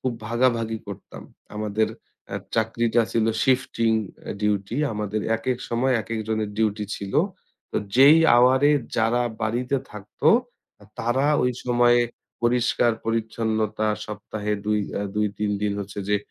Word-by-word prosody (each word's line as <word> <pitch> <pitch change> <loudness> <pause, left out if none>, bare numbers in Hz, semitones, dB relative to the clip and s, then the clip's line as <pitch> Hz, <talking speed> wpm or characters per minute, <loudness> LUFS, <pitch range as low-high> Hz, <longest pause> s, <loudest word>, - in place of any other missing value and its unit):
খুব 130 - -1 0.2
ভাগাভাগি 115 -2 +1
করতাম। 100 -1 -9 0.3
আমাদের 105 +1 0 0.7
চাকরিটা 115 +1 +2
ছিল 115 -1 +2 0.2
শিফটিং 125 -3 +2 0.5
ডিউটি 105 +1 -1 0.2
আমাদের 105 0 -2 0.2
একেক 120 +2 -2
সময় 125 +3 +1
একেক 110 +2 -4
জনের 110 -1 -1
ডিউটি 105 -1 0
ছিল। 100 -1 -7 0.6
তো - - -3 0.2
যেই 140 +4 +8 0.2
আওয়ার 125 +2 +5
এ - - +5 0.2
যারা 115 +2 +2 0.2
বাড়িতে 125 +5 0
থাকতো 105 +8 -2 0.5
আ - - -14
তারা 125 +4 +1 0.2
ঐ - - +2 0.2
সময়ে 120 0 +4 0.4
পরিষ্কার-পরিচ্ছন্নতা 110 -2 0 0.2
সপ্তাহে 105 0 -4
২ 105 0 +1 0.2
আ - - -1
২-৩ 105 0 -1
দিন 105 -1 +1
হচ্ছে 100 +1 -7
যে 105 - +3
110 Hz, 125 wpm, -24 LUFS, 105-120 Hz, 0.7 s, যেই